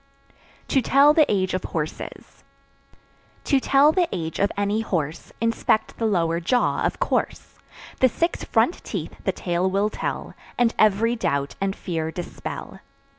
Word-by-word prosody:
To 270 Hz, -, +3 dB
Tell 280 Hz, +4 st, +5 dB
the 305 Hz, -1 st, +4 dB
Age 190 Hz, -2 st, 0 dB
of 185 Hz, -, -2 dB
Horses. 155 Hz, -2 st, -6 dB, 1.0 s
To 275 Hz, -, +3 dB
tell 275 Hz, +3 st, +5 dB
the 350 Hz, 0 st, +1 dB
age 165 Hz, -3 st, -4 dB
of 200 Hz, -, +2 dB
any 205 Hz, +2 st, 0 dB
horse, 165 Hz, -6 st, -3 dB
Inspect 230 Hz, -1 st, 0 dB
the 225 Hz, -, +1 dB
lower 170 Hz, -5 st, +1 dB
jaw, 245 Hz, +9 st, +1 dB
of -, -, -1 dB
course; -, -, -2 dB, 0.4 s
The 260 Hz, -, +5 dB
six 335 Hz, +8 st, -1 dB
front -, -, +1 dB
teeth -, -, -5 dB
the -, -, +2 dB
tale 175 Hz, +1 st, -1 dB
will 200 Hz, +3 st, +1 dB
tell, -, -, -4 dB, 0.2 s
And 240 Hz, -1 st, +3 dB
every 215 Hz, +3 st, +3 dB
doubt 140 Hz, -10 st, -1 dB
and 195 Hz, 0 st, 0 dB
fear 160 Hz, -3 st, -3 dB
dispel. 175 Hz, +2 st, -7 dB
200 Hz, 150 wpm, -23 LUFS, 175-240 Hz, 1.0 s, Tell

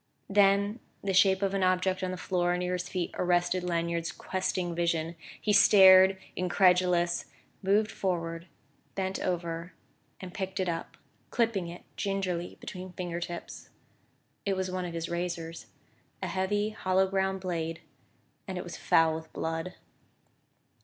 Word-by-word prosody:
Then 200 Hz, +2 st, +4 dB, 0.2 s
the 195 Hz, -1 st, 0 dB
shape 190 Hz, +1 st, +4 dB
of 195 Hz, 0 st, +1 dB
an 195 Hz, -, 0 dB
object 185 Hz, 0 st, +2 dB
on 185 Hz, -, -1 dB
the 185 Hz, -, -4 dB
floor 180 Hz, -1 st, 0 dB
near 180 Hz, 0 st, -1 dB
his 180 Hz, 0 st, -3 dB
feet 180 Hz, -3 st, -2 dB
arrested 175 Hz, 0 st, +2 dB
Lanyard's 170 Hz, -1 st, -1 dB
questing 185 Hz, -2 st, -2 dB
vision. 170 Hz, -1 st, 0 dB, 0.2 s
He 210 Hz, -, +1 dB
stared, 190 Hz, -1 st, +8 dB, 0.2 s
incredulous, 180 Hz, -1 st, +3 dB, 0.4 s
moved 205 Hz, +3 st, +2 dB
forward, 170 Hz, -2 st, -3 dB, 0.5 s
bent 190 Hz, 0 st, -2 dB
over 170 Hz, -1 st, -3 dB, 0.5 s
and 185 Hz, -1 st, -8 dB
picked 190 Hz, -2 st, -4 dB
it 185 Hz, -, 0 dB
up, 165 Hz, -1 st, -4 dB, 0.3 s
clipping 225 Hz, -7 st, 0 dB
it 170 Hz, +1 st, -9 dB
gingerly 185 Hz, -3 st, -2 dB
between 185 Hz, 0 st, -8 dB
finger 175 Hz, -1 st, -4 dB
tips. 175 Hz, 0 st, -7 dB, 0.7 s
It 200 Hz, -1 st, 0 dB
was 185 Hz, -1 st, -2 dB
one 185 Hz, 0 st, -2 dB
of 175 Hz, -, -5 dB
his 165 Hz, 0 st, -3 dB
razors 170 Hz, -1 st, -4 dB, 0.6 s
a -, -, -1 dB
heavy 205 Hz, +3 st, 0 dB
hollow 190 Hz, -2 st, +2 dB
ground 190 Hz, 0 st, 0 dB
blade 165 Hz, -3 st, -3 dB, 0.7 s
and 190 Hz, -2 st, -4 dB
it 180 Hz, -, -3 dB
was 175 Hz, -, -8 dB
foul 165 Hz, -1 st, +3 dB
with 160 Hz, 0 st, -7 dB
blood. 165 Hz, +2 st, -3 dB
180 Hz, 145 wpm, -29 LUFS, 170-190 Hz, 0.7 s, stared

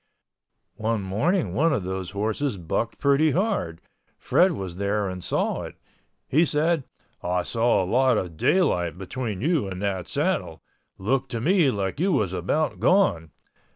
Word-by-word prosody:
One 110 Hz, -1 st, -1 dB
morning 150 Hz, -, 0 dB
one 165 Hz, +3 st, +2 dB
of 130 Hz, -10 st, 0 dB
those 95 Hz, 0 st, -4 dB
horses 110 Hz, +5 st, -2 dB
bucked 90 Hz, +6 st, -2 dB
pretty 140 Hz, +2 st, +3 dB
hard. 180 Hz, -, -1 dB, 0.4 s
Fred 185 Hz, 0 st, +3 dB
was 95 Hz, -, -6 dB
there 100 Hz, +1 st, 0 dB
and 90 Hz, -1 st, -6 dB
saw -, -, -1 dB
it. -, -, -8 dB, 0.5 s
He 155 Hz, +5 st, +3 dB
said, 155 Hz, -1 st, +1 dB, 0.4 s
"I 90 Hz, 0 st, 0 dB
saw 115 Hz, -2 st, +2 dB
a -, -, -2 dB
lot 125 Hz, +4 st, +3 dB
of 90 Hz, -5 st, -3 dB
daylight 90 Hz, -, +1 dB
between 105 Hz, +1 st, -4 dB
you 155 Hz, -, +1 dB
and 95 Hz, -1 st, -6 dB
that 95 Hz, -3 st, -2 dB
saddle. -, -, -2 dB, 0.3 s
Looked 130 Hz, +7 st, -1 dB
to 115 Hz, -, -1 dB
me 170 Hz, -, +3 dB
like 100 Hz, -1 st, -2 dB
you 190 Hz, +4 st, +2 dB
was 105 Hz, -, 0 dB
about 145 Hz, -, -1 dB
gone." 180 Hz, -, +3 dB
110 Hz, 155 wpm, -25 LUFS, 95-150 Hz, 0.5 s, pretty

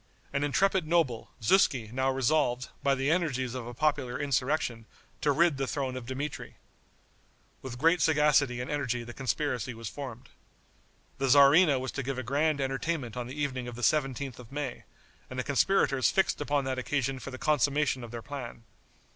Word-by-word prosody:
An 140 Hz, 0 st, 0 dB
intrepid 180 Hz, +4 st, +2 dB
noble, 155 Hz, -9 st, +1 dB
Zuski, 125 Hz, -, +3 dB
now 130 Hz, +2 st, 0 dB
resolved, 130 Hz, -1 st, +1 dB
by 140 Hz, -1 st, +2 dB
the 135 Hz, +3 st, 0 dB
energies 130 Hz, -8 st, 0 dB
of 125 Hz, -2 st, -5 dB
a 120 Hz, -, -7 dB
popular 145 Hz, -3 st, 0 dB
insurrection, 130 Hz, -4 st, -1 dB, 0.3 s
to 150 Hz, -, +3 dB
rid 165 Hz, 0 st, +3 dB
the 135 Hz, -1 st, -1 dB
throne 130 Hz, -2 st, -2 dB
of 125 Hz, -2 st, -7 dB
Dmitri. 140 Hz, +3 st, -5 dB, 1.1 s
With 130 Hz, -2 st, -7 dB
great 165 Hz, +5 st, +3 dB
sagacity 150 Hz, -5 st, +3 dB
and 125 Hz, +3 st, -4 dB
energy 130 Hz, -5 st, -1 dB
the 120 Hz, 0 st, -9 dB
conspiracy 130 Hz, -3 st, -2 dB
was 115 Hz, -2 st, -6 dB
formed. 130 Hz, -2 st, -8 dB, 0.9 s
The 135 Hz, -, +1 dB
tzarina 140 Hz, +2 st, +6 dB
was 130 Hz, 0 st, -4 dB
to 140 Hz, -, -3 dB
give 135 Hz, 0 st, -3 dB
a 130 Hz, -, -3 dB
grand 145 Hz, +4 st, +1 dB
entertainment 135 Hz, -1 st, -2 dB
on 125 Hz, -1 st, -4 dB
the 135 Hz, +4 st, -8 dB
evening 130 Hz, -4 st, -2 dB
of 120 Hz, -, -7 dB
the 120 Hz, -, -7 dB
17th 135 Hz, -3 st, 0 dB
of 125 Hz, -1 st, -12 dB
May, 140 Hz, -4 st, -5 dB, 0.4 s
and 130 Hz, -, -7 dB
the 125 Hz, -, -1 dB
conspirators 140 Hz, -2 st, +2 dB
fixed 190 Hz, -5 st, +1 dB
upon 145 Hz, -1 st, 0 dB
that 130 Hz, -1 st, -2 dB
occasion 135 Hz, 0 st, -1 dB
for 125 Hz, -, -7 dB
the 130 Hz, -, -7 dB
consummation 145 Hz, -2 st, +1 dB
of 120 Hz, -, -8 dB
their 115 Hz, 0 st, -7 dB
plan. 130 Hz, -5 st, -7 dB
135 Hz, 180 wpm, -29 LUFS, 125-145 Hz, 1.1 s, tzarina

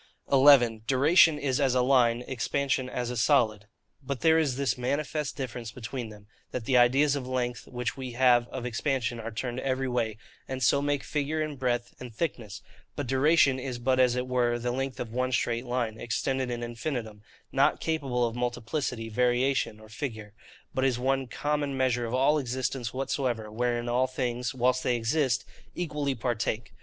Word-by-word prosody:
11. 130 Hz, -5 st, +6 dB
Duration 150 Hz, +4 st, +5 dB
is 140 Hz, -1 st, 0 dB
as 130 Hz, -2 st, +2 dB
a 125 Hz, -, +3 dB
Line, 125 Hz, -2 st, +3 dB
Expansion 130 Hz, 0 st, -1 dB
as 125 Hz, -1 st, -3 dB
a -, -, -4 dB
Solid. 110 Hz, -5 st, +2 dB, 0.3 s
But 135 Hz, -1 st, -5 dB
there 160 Hz, 0 st, +5 dB
is 145 Hz, -6 st, +1 dB
this 140 Hz, 0 st, 0 dB
manifest 140 Hz, +3 st, -2 dB
difference 120 Hz, -4 st, -5 dB
between 120 Hz, +1 st, -6 dB
them,—That 105 Hz, +3 st, -10 dB
the 130 Hz, -, +1 dB
ideas 135 Hz, +4 st, +4 dB
of 130 Hz, -3 st, -4 dB
length 125 Hz, -2 st, -2 dB
which 125 Hz, -1 st, -3 dB
we 130 Hz, -2 st, -6 dB
have 120 Hz, -1 st, +4 dB
of 125 Hz, 0 st, -6 dB
expansion 120 Hz, -1 st, -1 dB
are 115 Hz, 0 st, -5 dB
turned 120 Hz, +2 st, -4 dB
every 135 Hz, 0 st, -1 dB
way, 115 Hz, -4 st, -1 dB, 0.3 s
and 130 Hz, 0 st, -4 dB
so 130 Hz, +4 st, +4 dB
make 145 Hz, -1 st, 0 dB
figure, 155 Hz, +1 st, -1 dB
and 150 Hz, -3 st, -6 dB
breadth, 120 Hz, -2 st, -1 dB
and 125 Hz, -1 st, -8 dB
thickness; 110 Hz, -, -4 dB, 0.3 s
but 145 Hz, -, -3 dB
duration 135 Hz, +1 st, +3 dB
is 130 Hz, -1 st, -4 dB
but 130 Hz, +2 st, +1 dB
as 125 Hz, -1 st, +4 dB
it 125 Hz, 0 st, -1 dB
were 120 Hz, -2 st, +1 dB
the 120 Hz, +1 st, -2 dB
length 135 Hz, +1 st, -3 dB
of 115 Hz, -2 st, -5 dB
one 130 Hz, +1 st, 0 dB
straight 120 Hz, 0 st, -1 dB
line, 120 Hz, -3 st, -2 dB
extended 130 Hz, +3 st, -1 dB
in 120 Hz, -1 st, -3 dB
infinitum, 115 Hz, -3 st, -4 dB, 0.3 s
not -, -, +3 dB
capable 135 Hz, -7 st, 0 dB
of 115 Hz, 0 st, -3 dB
multiplicity, 125 Hz, 0 st, -2 dB
variation, 125 Hz, 0 st, +1 dB
or 110 Hz, -, -14 dB
figure; 110 Hz, -4 st, -6 dB, 0.4 s
but 130 Hz, -, 0 dB
is 130 Hz, -3 st, +2 dB
one 135 Hz, +1 st, 0 dB
common 145 Hz, +1 st, -2 dB
measure 125 Hz, -2 st, +1 dB
of 115 Hz, -, -5 dB
all 140 Hz, +4 st, +3 dB
existence 125 Hz, -2 st, -3 dB
whatsoever, 125 Hz, -4 st, -2 dB
wherein 120 Hz, +1 st, -1 dB
all 125 Hz, +2 st, +2 dB
things, 125 Hz, -1 st, -3 dB
whilst 125 Hz, +1 st, +2 dB
they 125 Hz, -, +1 dB
exist, 120 Hz, 0 st, 0 dB, 0.3 s
equally 150 Hz, -5 st, -2 dB
partake. 115 Hz, -2 st, -2 dB
125 Hz, 175 wpm, -28 LUFS, 120-135 Hz, 0.4 s, 11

